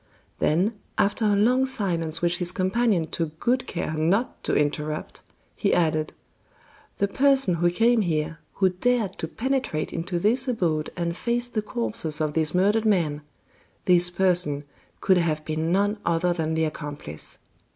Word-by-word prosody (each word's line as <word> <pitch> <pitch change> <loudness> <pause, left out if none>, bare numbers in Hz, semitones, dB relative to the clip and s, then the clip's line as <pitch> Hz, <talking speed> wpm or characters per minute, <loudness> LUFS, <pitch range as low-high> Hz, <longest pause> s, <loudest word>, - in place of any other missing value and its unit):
Then, 195 +7 +1 0.2
after 205 +2 +1
a 205 -1 +3
long 250 +6 +3
silence 170 -10 -1
which 175 0 +2
his 175 -1 +2
companion 190 -1 +1
took 160 0 -4
good 255 +1 0
care 170 -3 -3
not 170 +10 0
to - - +1
interrupt, 150 +1 -2 0.3
he - - +1
added: 155 -2 +1 0.8
"The 200 - +1
person 270 -2 +3
who 175 - +4
came 230 +6 +3
here, 165 -2 -1
who 190 -1 +2
dared 210 +1 0
to 160 - -3
penetrate 250 - -2
into 170 +2 -3
this 235 +9 +2
abode 165 -11 0
and 170 -1 -2
face 240 +4 -1
the 235 -3 -2
corpses 215 -8 -3
of 155 -1 -1
these 160 +1 +1
murdered 205 +4 +3
men 165 -8 +1 0.6
this 180 -1 +5
person 175 -5 +1 0.4
could 190 -2 +4
have 155 -3 -1
been 160 +1 -1
none 205 +3 +1
other 170 +1 +1
than 160 -2 -2
the 160 0 +2
accomplice. 145 - -6
180 Hz, 155 wpm, -25 LUFS, 160-215 Hz, 0.8 s, this